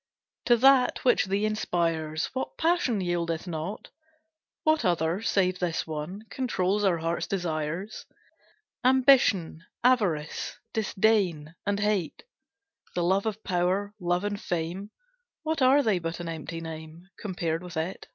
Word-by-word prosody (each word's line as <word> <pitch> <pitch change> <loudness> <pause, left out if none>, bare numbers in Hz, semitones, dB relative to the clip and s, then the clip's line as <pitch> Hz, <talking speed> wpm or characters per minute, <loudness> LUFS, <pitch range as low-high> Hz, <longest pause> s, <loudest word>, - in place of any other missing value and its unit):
To 240 - +5
that, 260 +1 +4
which 245 - +4
thee 200 +2 0
inspires, 165 -7 -1
What 260 - -4
passion 320 - +1
yieldeth 170 -2 -1
not? 175 +3 -5 0.7
What 310 0 +3
other, 170 +1 +1
save 185 -4 +1
this 175 -3 -1
one, 160 +6 -5
Controls 210 -6 0
our 185 -4 +3
hearts' 165 +1 -2
desires? 175 +1 -3 0.8
Ambition, 250 - +4 0.2
avarice, 200 -12 +1 0.2
disdain, 190 -7 +1
and 205 0 +1
hate, 205 -5 -1 0.7
The 175 - +1
love 190 +4 +2
of 220 0 -4
power, 185 +3 0
love 175 +1 0
of 205 0 -3
fame, 175 +4 -3 0.5
What 315 -2 -1
are 270 +3 +5
they 210 -6 +2
but 165 0 -4
an 175 - -5
empty 165 0 -5
name, 160 +1 -9
Compared 170 -5 -2
with 180 -3 -8
it? 165 +4 -3
185 Hz, 130 wpm, -27 LUFS, 165-215 Hz, 0.8 s, To